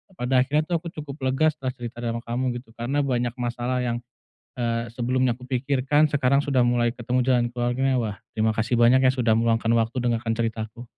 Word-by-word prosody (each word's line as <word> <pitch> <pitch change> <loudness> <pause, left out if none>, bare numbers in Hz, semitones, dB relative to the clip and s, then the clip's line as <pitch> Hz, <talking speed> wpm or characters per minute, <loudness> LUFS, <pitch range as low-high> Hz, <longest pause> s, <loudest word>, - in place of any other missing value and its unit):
pada 125 -3 +1
akhirnya 145 +4 +2
tuh 170 +1 -1
aku 170 - -9
cukup 150 -1 -7
lega 155 +4 +3
setelah 135 -4 -5
cerita 120 -1 -7
dengan 115 0 -3
kamu, 125 +1 -2
gitu, 120 -2 -9
karena 135 +5 -1
banyak 125 -3 -1
masalah 120 +1 -2
yang, 120 -1 -1 0.6
eee, 115 -1 -1
sebelumnya 125 +1 +1
aku 125 0 -13
pikirkan 135 +3 +2
sekarang 140 0 +3
sudah 135 -3 +2
mulai 120 -1 +2
ketemu 125 +1 -1
jalan 125 -2 +3
keluarnya. 125 +2 0
Wah, 105 -3 -4 0.2
terima 110 0 +2
kasih 115 +2 0
banyak, 120 +2 +5
ya, - - +4
sudah 115 -3 +2
meluangkan 115 0 +2
waktu 115 +2 +1
dengarkan 115 -1 0
ceritaku. 115 0 -3
120 Hz, 190 wpm, -24 LUFS, 115-130 Hz, 0.6 s, banyak